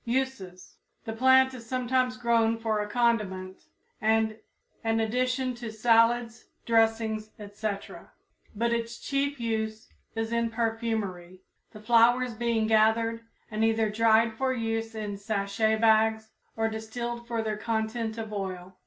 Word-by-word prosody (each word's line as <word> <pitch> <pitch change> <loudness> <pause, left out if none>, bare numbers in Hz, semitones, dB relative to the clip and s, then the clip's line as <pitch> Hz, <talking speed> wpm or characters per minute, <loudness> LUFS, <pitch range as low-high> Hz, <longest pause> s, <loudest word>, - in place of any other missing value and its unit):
Uses. 235 -8 -3 0.3
The 225 - -4
plant 260 +2 +5
is 235 -3 -10
sometimes 255 0 0
grown 230 -2 +2
for 220 -2 -1
a 210 - -5
condiment 205 -6 -1 0.4
and 220 0 +1 0.4
an 225 0 +1
addition 250 +3 0
to 235 -2 -6
salads, 230 +1 +2 0.2
dressings, 225 -1 +1
etc., 205 0 -6 0.5
but 235 +2 +1
its 235 0 -3
chief 280 0 -2
use 220 -1 -3 0.3
is 225 0 -2
in 235 0 +1
perfumery, 220 -6 -3 0.3
the 215 - -11
flowers 240 +2 +4
being 230 -1 0
gathered 225 +1 +2 0.3
and 215 +1 -1
either 225 -1 +2
dried 225 +1 +3
for 260 +3 -1
use 225 -2 -2
in 210 -2 -4
sachet 205 +1 0
bags 220 0 +3 0.3
or 225 0 +1
distilled 235 +2 -5
for 230 -2 -2
their 215 -1 -2
content 220 0 -2
of 220 -1 -5
oil. 190 -2 -5
225 Hz, 135 wpm, -28 LUFS, 220-235 Hz, 0.5 s, plant